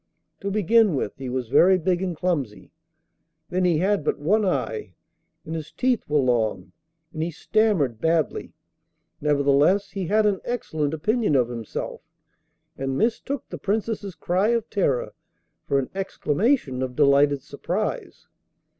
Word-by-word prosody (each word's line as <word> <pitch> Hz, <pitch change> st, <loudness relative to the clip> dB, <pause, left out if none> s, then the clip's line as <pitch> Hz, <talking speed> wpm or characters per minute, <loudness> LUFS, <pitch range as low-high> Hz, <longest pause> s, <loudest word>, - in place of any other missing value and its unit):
To 200 Hz, -, -3 dB
begin 210 Hz, -1 st, +3 dB
with, 125 Hz, -, -2 dB
he 130 Hz, -2 st, -5 dB
was 125 Hz, -1 st, -3 dB
very 185 Hz, +8 st, +5 dB
big 180 Hz, 0 st, 0 dB
and 180 Hz, -4 st, -3 dB
clumsy, 145 Hz, -13 st, -2 dB, 0.8 s
then 185 Hz, 0 st, +1 dB
he 170 Hz, -3 st, +3 dB
had 190 Hz, +1 st, +1 dB
but -, -, 0 dB
one 205 Hz, +9 st, +2 dB
eye, 110 Hz, -, -2 dB, 0.5 s
and 160 Hz, -, -6 dB
his 155 Hz, -2 st, -5 dB
teeth 250 Hz, -3 st, +1 dB
were 150 Hz, -, +2 dB
long, 110 Hz, -8 st, 0 dB, 0.4 s
and 155 Hz, -, -4 dB
he 165 Hz, -, -1 dB
stammered 170 Hz, -, +1 dB
badly; 160 Hz, -3 st, 0 dB, 0.7 s
nevertheless, 145 Hz, +6 st, +3 dB
he 190 Hz, -3 st, -4 dB
had 215 Hz, +3 st, +3 dB
an 200 Hz, -3 st, +1 dB
excellent 160 Hz, -11 st, -2 dB
opinion 210 Hz, -, +1 dB
of 125 Hz, -3 st, +3 dB
himself, 115 Hz, -3 st, -5 dB, 0.7 s
and 135 Hz, 0 st, -3 dB
mistook 240 Hz, +5 st, -1 dB
the -, -, -7 dB
Princess's 205 Hz, -2 st, -2 dB
cry 185 Hz, +4 st, 0 dB
of 235 Hz, -1 st, +1 dB
terror 145 Hz, -, 0 dB, 0.5 s
for 140 Hz, -, +2 dB
an 135 Hz, -2 st, -2 dB
exclamation 190 Hz, -, 0 dB
of 130 Hz, -1 st, -3 dB
delighted 140 Hz, -1 st, +4 dB
surprise. 175 Hz, +8 st, -4 dB
165 Hz, 145 wpm, -24 LUFS, 140-205 Hz, 0.8 s, very